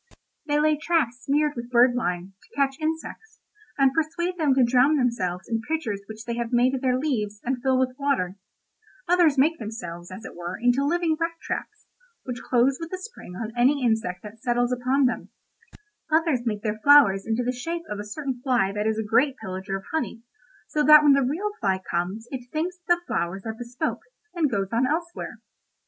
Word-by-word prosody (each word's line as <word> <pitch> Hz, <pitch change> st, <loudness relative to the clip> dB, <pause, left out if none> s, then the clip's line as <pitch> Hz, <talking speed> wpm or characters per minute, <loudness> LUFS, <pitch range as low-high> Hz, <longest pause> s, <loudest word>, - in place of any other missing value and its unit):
"They 295 Hz, 0 st, +2 dB
lay 305 Hz, 0 st, +3 dB
traps 295 Hz, -6 st, 0 dB
smeared 295 Hz, +1 st, +1 dB
with 235 Hz, 0 st, -6 dB
bird 245 Hz, 0 st, +5 dB
lime, 185 Hz, -6 st, -2 dB
to -, -, -23 dB
catch 275 Hz, -1 st, 0 dB
insects, 320 Hz, +7 st, -5 dB, 0.4 s
and 270 Hz, -2 st, +4 dB
persuade 335 Hz, +3 st, -1 dB
them 300 Hz, -6 st, +2 dB
to 265 Hz, -, +5 dB
drown 255 Hz, +5 st, +4 dB
themselves 210 Hz, -9 st, -1 dB
in 225 Hz, -1 st, -1 dB
pitchers 225 Hz, -7 st, -3 dB
which 220 Hz, +1 st, -8 dB
they 235 Hz, -, -3 dB
have 235 Hz, 0 st, -3 dB
made 245 Hz, +2 st, +3 dB
of 265 Hz, -, -2 dB
their 255 Hz, -1 st, +2 dB
leaves, 215 Hz, -8 st, -2 dB
and 255 Hz, 0 st, -2 dB
fill 265 Hz, 0 st, +2 dB
with 255 Hz, 0 st, 0 dB
water; 265 Hz, -11 st, 0 dB, 0.7 s
others 345 Hz, -5 st, +4 dB
make 315 Hz, +5 st, +3 dB
themselves, 175 Hz, -6 st, -7 dB
as 190 Hz, +4 st, -9 dB
it -, -, -9 dB
were, 175 Hz, +1 st, -5 dB
into 245 Hz, +3 st, +2 dB
living 325 Hz, +1 st, +1 dB
rat 335 Hz, 0 st, -1 dB
traps, 425 Hz, -, -6 dB, 0.4 s
which 250 Hz, -2 st, -5 dB
close 255 Hz, +2 st, +2 dB
with 330 Hz, -, -6 dB
a -, -, -1 dB
spring 375 Hz, -, -10 dB
on 220 Hz, +3 st, -5 dB
any 255 Hz, +2 st, +3 dB
insect 220 Hz, -6 st, 0 dB
that 220 Hz, +1 st, -11 dB
settles 245 Hz, -1 st, +1 dB
upon 255 Hz, +3 st, +2 dB
them; 250 Hz, -, -1 dB, 0.8 s
others 310 Hz, -6 st, +2 dB
make 210 Hz, -2 st, -2 dB
their 215 Hz, -1 st, -2 dB
flowers 230 Hz, -8 st, +6 dB
into 225 Hz, +2 st, 0 dB
the 250 Hz, -, 0 dB
shape 330 Hz, +7 st, -4 dB
of 210 Hz, -, -5 dB
a -, -, -4 dB
certain 255 Hz, +3 st, -5 dB
fly 245 Hz, -7 st, +2 dB
that 210 Hz, +1 st, -1 dB
is 220 Hz, 0 st, 0 dB
a 220 Hz, -, -1 dB
great 240 Hz, +6 st, +2 dB
pillager 190 Hz, -2 st, -4 dB
of 195 Hz, -, -11 dB
honey, 300 Hz, -7 st, -3 dB, 0.4 s
so 300 Hz, -, 0 dB
that 300 Hz, 0 st, +8 dB
when 290 Hz, -2 st, +7 dB
the 275 Hz, -, +4 dB
real 325 Hz, +11 st, -1 dB
fly 190 Hz, -2 st, +1 dB
comes 185 Hz, +7 st, -2 dB
it 250 Hz, -2 st, -6 dB
thinks 345 Hz, +4 st, -2 dB
that 345 Hz, -, +5 dB
the 345 Hz, -, -13 dB
flowers 175 Hz, -, -2 dB
are 220 Hz, -, -3 dB
bespoke, 240 Hz, +2 st, -4 dB, 0.3 s
and 330 Hz, -5 st, +1 dB
goes 195 Hz, -5 st, -1 dB
on 235 Hz, +3 st, +2 dB
elsewhere. 335 Hz, +4 st, -4 dB
250 Hz, 200 wpm, -25 LUFS, 220-300 Hz, 0.8 s, that